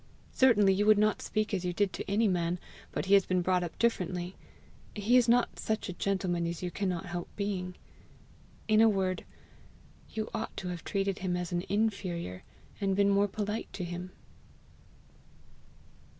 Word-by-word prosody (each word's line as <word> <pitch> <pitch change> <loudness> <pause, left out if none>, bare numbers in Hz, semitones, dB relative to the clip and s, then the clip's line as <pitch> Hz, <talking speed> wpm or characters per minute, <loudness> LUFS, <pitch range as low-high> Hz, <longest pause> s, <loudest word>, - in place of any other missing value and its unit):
Certainly 210 -7 +5
you 205 +2 +1
would 215 -1 +7
not 215 0 +2
speak 215 0 -1
as 190 - +1
he 180 0 -2
did 200 +1 +1
to - - -5
any 215 +3 +3
man, 175 -2 0 0.3
but - - -2
he 195 - +2
has 195 -2 +6
been 185 -1 +1
brought 185 0 +2
up 170 - -6
differently; 180 -5 0 0.6
he 210 +4 +2
is 245 -2 +5
not 240 +1 +3
such 220 -1 -1
a - - -3
gentleman 180 -2 -1
as 170 +1 -4
you 180 - -2
cannot 185 -2 -2
help 175 -1 -4
being. 190 -3 -3 0.9
In 215 0 +5
a 225 - +7
word, 190 -3 -1 0.8
you 220 0 -3
ought 225 -1 -4
to 180 - -4
have 175 -1 -5
treated 195 -1 -1
him 180 -2 -1
as 180 0 -4
an 175 0 0
inferior, 190 - -1 0.4
and 195 -2 +1
been 200 0 +4
more 200 +1 +4
polite 210 +2 -3
to 185 - -4
him." 175 +1 -5
195 Hz, 175 wpm, -30 LUFS, 180-210 Hz, 0.9 s, would